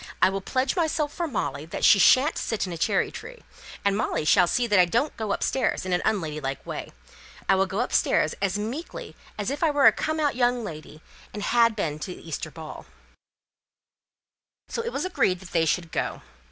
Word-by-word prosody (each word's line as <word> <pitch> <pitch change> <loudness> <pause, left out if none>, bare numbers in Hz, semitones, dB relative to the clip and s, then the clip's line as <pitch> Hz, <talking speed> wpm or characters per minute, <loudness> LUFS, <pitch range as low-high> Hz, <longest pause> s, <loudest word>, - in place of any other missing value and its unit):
I - - +5
will 195 0 -3
pledge 255 +6 -1
myself 315 -4 0
for 340 - -2
Molly 145 - -3
that - - -2
she 200 - +7
shan't 265 +9 +5
sit 220 -3 -2
in 180 - -5
a - - -5
cherry - - +1
tree; 485 +1 -10 0.4
and 200 -1 +3
Molly 205 -7 -1
shall 175 +3 +5
see 245 +7 +1
that 205 -4 +3
I 180 - +7
don't 235 - 0
go 220 -2 -3
upstairs 255 -1 0
in 185 - -1
an 175 - +1
unladylike 155 -8 -2
way. - - -6 0.6
I - - +5
will 190 0 +2
go 195 +5 -2
upstairs 245 - +1
as 200 0 0
meekly 240 +11 -6 0.2
as 205 +3 -2
if 285 - -4
I 325 - +4
were 290 -2 +3
a - - +10
come 315 0 -2
out 290 -4 +1
young 245 -1 +1
lady, 155 -4 -9 0.3
and 205 - -4
had 230 -1 +3
been 155 -7 -2
to 180 +4 -6
the - - -14
Easter 155 0 -4
ball." 155 0 -10 1.8
So - - -2
it 470 +1 -4
was - - -2
agreed 185 - +1
that 190 -1 -12
they 165 -1 +2
should 165 +1 -1
go. - - -3
205 Hz, 205 wpm, -25 LUFS, 175-265 Hz, 1.8 s, a